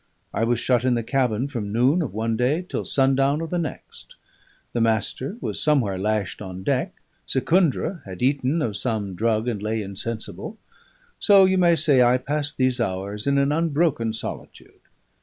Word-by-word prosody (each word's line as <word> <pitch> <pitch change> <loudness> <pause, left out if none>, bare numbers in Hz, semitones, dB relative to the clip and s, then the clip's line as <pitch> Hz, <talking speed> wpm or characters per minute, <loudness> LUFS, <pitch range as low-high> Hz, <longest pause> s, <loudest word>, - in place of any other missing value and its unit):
I - - 0
was 120 0 +1
shut 125 -1 +1
in 130 -1 +2
the 120 - -1
cabin 125 -1 0
from 115 -8 -5
noon 130 - +3
of 150 - -3
one 110 +2 -1
day 135 +10 0
till - - -3
sundown 135 +2 +2
of 165 -1 -5
the 175 - 0
next; 160 - -7 0.6
the 120 - 0
Master 115 - 0
was - - -2
somewhere 120 -11 +1
lashed 105 -1 -2
on 95 -2 -7
deck; - - -1 0.3
Secundra 165 - +1
had 95 +2 -7
eaten 140 +3 +1
of 110 -4 -2
some 105 -3 -2
drug 110 +3 0
and 110 -5 -2
lay 110 +1 -2
insensible; 110 - -4 0.6
so 200 -2 +6
you 190 0 +2
may 170 -2 +5
say 150 -5 +3
I 125 +1 +5
passed 145 +2 -3
these 130 -1 +1
hours 100 +2 -3
in 140 0 +2
an 140 +1 +2
unbroken 150 -7 +1
solitude. 110 - -6
125 Hz, 175 wpm, -23 LUFS, 110-145 Hz, 0.6 s, so